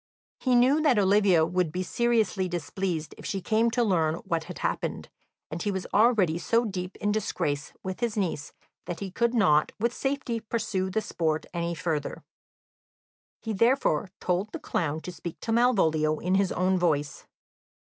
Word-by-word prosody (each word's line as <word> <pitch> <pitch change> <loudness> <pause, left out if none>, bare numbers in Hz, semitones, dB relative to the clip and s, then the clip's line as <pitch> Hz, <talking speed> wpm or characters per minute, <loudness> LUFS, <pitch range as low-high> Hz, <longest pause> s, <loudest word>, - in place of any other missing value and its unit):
He 255 -2 +2
knew 260 +5 +4
that 290 -7 +3
Olivia 195 -4 +4
would 175 -1 0
be 180 +3 -2
seriously 220 -3 +1
displeased 175 -1 -3
if - - -10
she 195 - -2
came 220 +4 +2
to 240 +1 +1
learn 165 -7 +2
what 165 -1 -1
had - - -8
happened, - - -3 0.4
and 165 +2 -4
he 205 - -1
was 190 -2 -3
already 205 -7 +4
so 230 +7 +2
deep 185 -3 -4
in 205 0 -1
disgrace 150 -9 -2
with 185 -1 -5
his 235 -3 -1
niece 170 -7 -2 0.4
that 175 - -4
he 195 -2 -5
could 235 +5 0
not 155 -9 +4
with 235 +2 0
safety 270 -4 -2
pursue 215 -4 -2
the 220 +4 0
sport 160 -6 -1
any 170 0 -2
further. 155 -3 -3 1.2
He 225 - -2
therefore 220 - +2
told 185 +4 -1
the - - -5
clown 160 -2 -2
to 180 - -6
speak 170 -1 -8
to 225 - -3
Malvolio 160 -11 +3
in 180 +4 -1
his 195 -1 +2
own 185 +1 +1
voice. 150 -4 -1
190 Hz, 170 wpm, -27 LUFS, 170-225 Hz, 1.2 s, knew